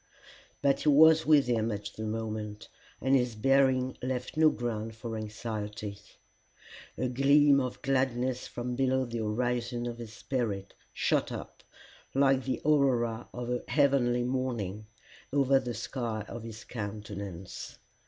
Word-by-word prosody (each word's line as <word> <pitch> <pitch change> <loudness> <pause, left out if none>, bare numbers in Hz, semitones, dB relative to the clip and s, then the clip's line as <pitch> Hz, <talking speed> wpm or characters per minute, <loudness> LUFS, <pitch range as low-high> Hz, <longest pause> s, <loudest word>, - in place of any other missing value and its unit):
But 140 -1 +3
he 150 - +2
was 160 +2 +7
with 150 -3 +6
him 115 -2 +1
at 105 -1 -5
the 110 - -5
moment, 110 -1 -4 0.3
and 135 +2 +3
his 125 -3 +1
bearing 130 +2 +2
left 125 -1 -3
no 155 0 +6
ground 115 -4 -3
for 115 0 -5
anxiety. 105 -1 -5 1.0
A 130 - 0
gleam 140 +3 +5
of 125 -2 -4
gladness 130 -2 0
from 120 0 -4
below 130 0 +1
the 120 -1 -4
horizon 120 +2 -1
of 120 0 -5
his 115 -2 -7
spirit, 110 -4 -3 0.2
shot - - +1
up, - - -7 0.5
like 135 -1 +3
the 130 - -1
aurora 125 -6 +2
of 125 0 -5
a 125 - -1
heavenly 125 -3 +3
morning, 120 -6 -2 0.4
over 135 -1 +4
the 120 -3 -4
sky 115 -2 -3
of 120 - -7
his 110 0 -8
countenance. 100 -4 -6
120 Hz, 140 wpm, -30 LUFS, 110-135 Hz, 1.0 s, was